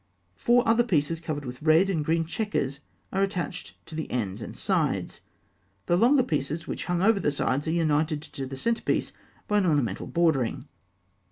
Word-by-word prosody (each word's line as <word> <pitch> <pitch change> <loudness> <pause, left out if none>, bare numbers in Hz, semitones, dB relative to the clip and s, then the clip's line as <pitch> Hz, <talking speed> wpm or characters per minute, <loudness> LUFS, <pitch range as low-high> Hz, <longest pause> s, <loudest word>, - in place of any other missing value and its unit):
Four 240 - +3
other 225 +1 +5
pieces 165 -7 0
covered 150 -4 -4
with 125 0 -7
red 160 +4 +5
and 170 -6 0
green 165 +2 +1
chequers 160 -7 -2 0.3
are 195 - +1
attached 195 -3 -3
to - - -10
the 160 0 -4
ends 105 -4 -2
and - - -7
sides. - - 0 0.6
The 175 - +2
longer 250 +8 +5
pieces 155 - -2
which - - -4
hung 175 0 0
over 220 0 +4
the 170 - +1
sides 140 0 -1
are - - +1
united 155 -2 +1
to 135 -3 -6
the 135 0 -7
centre 230 - 0
piece - - -1 0.3
by 210 0 +3
an 190 - +1
ornamental 135 - 0
bordering. 160 -9 +1
160 Hz, 180 wpm, -27 LUFS, 145-195 Hz, 0.6 s, other